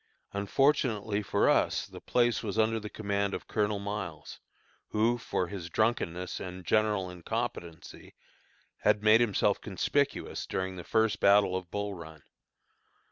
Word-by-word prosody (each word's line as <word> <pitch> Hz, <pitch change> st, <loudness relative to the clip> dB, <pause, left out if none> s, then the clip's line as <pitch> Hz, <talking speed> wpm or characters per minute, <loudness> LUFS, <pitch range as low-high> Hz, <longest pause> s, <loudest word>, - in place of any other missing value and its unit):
Unfortunately 110 Hz, -1 st, +1 dB
for 100 Hz, -, +1 dB
us -, -, +2 dB
the -, -, -11 dB
place 120 Hz, -1 st, +2 dB
was 105 Hz, -1 st, -4 dB
under 110 Hz, 0 st, +2 dB
the 105 Hz, -1 st, -7 dB
command 100 Hz, -2 st, -1 dB
of -, -, -8 dB
Colonel 105 Hz, -1 st, 0 dB
Miles, 95 Hz, -7 st, -6 dB, 0.5 s
who, 115 Hz, +3 st, +1 dB
for 95 Hz, -, -1 dB
his 90 Hz, -1 st, -7 dB
drunkenness 90 Hz, -4 st, -1 dB
and 90 Hz, -1 st, -7 dB
general 105 Hz, -1 st, +2 dB
incompetency, 90 Hz, -2 st, -6 dB, 0.6 s
had 105 Hz, 0 st, +2 dB
made 110 Hz, +2 st, +6 dB
himself 110 Hz, -5 st, +2 dB
conspicuous -, -, -1 dB
during 95 Hz, 0 st, -3 dB
the 90 Hz, -, -7 dB
first 110 Hz, +2 st, +1 dB
battle 100 Hz, -2 st, +5 dB
of 95 Hz, -2 st, -4 dB
Bull 100 Hz, +1 st, -3 dB
Run. 80 Hz, -4 st, -11 dB
100 Hz, 135 wpm, -30 LUFS, 95-110 Hz, 0.6 s, made